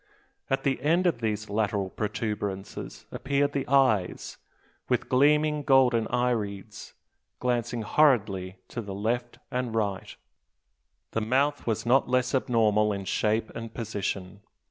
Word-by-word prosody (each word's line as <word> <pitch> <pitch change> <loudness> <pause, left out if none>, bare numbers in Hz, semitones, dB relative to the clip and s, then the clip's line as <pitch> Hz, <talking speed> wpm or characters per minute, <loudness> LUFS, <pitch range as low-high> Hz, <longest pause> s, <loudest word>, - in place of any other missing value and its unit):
At 135 0 0
the 135 -2 0
end 165 +6 +2
of 165 -9 +1
these 110 -1 -2
lateral 100 -2 -1
protuberances 105 -2 -4
appeared 140 +2 0
the 140 -1 -2
eyes, 130 -9 +2 0.5
with - - +1
gleaming 150 +3 +3
golden 130 -5 +4
irides, 105 -4 -2 0.4
glancing 120 -2 -1
horridly 105 -9 +2
to 120 - -4
the 100 -3 -7
right 115 +4 -2
and 125 -2 -2
left. 100 -3 -2 0.9
The 110 - -1
mouth 135 +6 +1
was 110 -1 -1
not 125 +3 +3
less 125 +1 +1
abnormal 110 -5 +2
in 100 -1 -4
shape 110 +3 0
and 115 -1 -6
position. 100 -3 -4
115 Hz, 125 wpm, -27 LUFS, 105-130 Hz, 0.9 s, golden